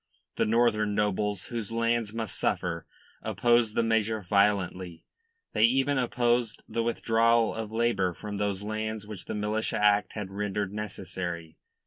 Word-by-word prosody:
The - - +1
northern 110 -2 +2
nobles 105 -1 0
whose 115 -3 -4
lands 115 -1 0
must 115 -2 -4
suffer 85 -2 -1 0.3
opposed 120 -2 +2
the 115 - +3
measure 110 -2 +1
violently; 95 -3 +1 0.5
they 110 - +5
even 135 +3 +2
opposed 120 -1 +1
the 115 - -1
withdrawal 115 0 +2
of 110 -1 -5
labour 110 -6 +1
from 105 +2 -6
those 100 -1 -1
lands 110 0 -3
which 105 -3 -8
the - - -4
Militia 105 +1 -1
Act 105 0 +3
had 105 -3 -5
rendered 100 0 -2
necessary. 90 -5 -5
105 Hz, 140 wpm, -28 LUFS, 100-115 Hz, 0.5 s, they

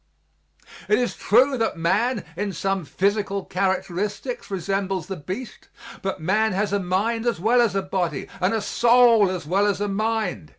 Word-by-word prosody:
It 210 - +4
is 245 -1 -1
true 255 +4 +3
that 225 -6 0
man, 205 +7 0
in 200 +2 -3
some 195 +1 -2
physical 200 +5 -1
characteristics 195 +5 -2
resembles 195 -1 -2
the 190 +1 -5
beast, 185 - -7 0.3
but 195 -1 -3
man 200 +6 +1
has 200 +1 -1
a 200 - +2
mind 210 +6 -1
as 235 -8 0
well 235 +6 +3
as 220 -5 +1
a 195 - 0
body, 175 -6 -2
and 185 +1 +1
a 220 - -1
soul 235 -2 +5
as 180 -4 -4
well 195 +6 +2
as 200 -2 0
a 205 - -1
mind. 215 - -2
200 Hz, 170 wpm, -23 LUFS, 185-220 Hz, 0.3 s, soul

